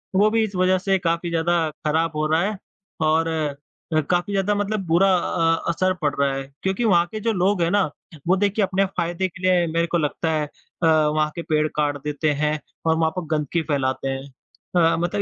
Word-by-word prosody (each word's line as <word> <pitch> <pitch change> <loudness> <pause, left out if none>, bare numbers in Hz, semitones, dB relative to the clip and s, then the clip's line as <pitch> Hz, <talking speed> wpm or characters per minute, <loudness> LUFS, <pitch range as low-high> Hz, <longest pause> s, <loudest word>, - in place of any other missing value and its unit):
वो 205 +3 +5
भी 225 0 +2
इस 205 -3 -4
वजह 185 +1 +3
से 195 +1 +1
काफ़ी 170 -1 -1
ज़्यादा 170 -1 +1 0.2
खराब 160 +1 +1
हो 155 0 0
रहा 160 +2 +2
है 205 +2 -1 0.5
और 160 +1 +2
अ 155 -3 -1 0.4
अ, 155 - +4
काफ़ी 180 +3 0
ज़्यादा 200 +1 +1
मतलब 205 -1 -2
बुरा 180 +4 +4
अ, 165 -2 0
असर 185 +2 +1
पड़ 145 -2 +1
रहा 140 -1 +2
है 135 0 -3 0.2
क्योंकि 190 +4 0
वहाँ 175 -5 +4
के 215 - -4
जो 225 +2 0
लोग 190 0 +1
हैं 165 - +2
ना, 205 0 +3 0.4
वो 185 - +4
देखिए 205 +1 +1
अपने 195 +1 +1
फ़ायदे 175 +2 0
के 180 0 -13
लिए 180 -2 +3
मेरे 170 0 +1
को 170 - 0
लगता 160 +1 -1
है 155 -1 0
अ, 165 +3 -5
वहाँ 155 -1 +3
के 170 - -4
पेड़ 155 0 +2
काट 145 -1 0
देते 150 +1 0
हैं 150 0 +1 0.3
और 160 - +3
वहाँ 160 0 +1
पर 180 - -3
गंदगी 150 +3 -1
फैलाते 135 -1 0
हैं 135 0 -3 0.5
अ, 165 -2 +4
मतलब 175 +4 -1
170 Hz, 215 wpm, -22 LUFS, 155-190 Hz, 0.5 s, वो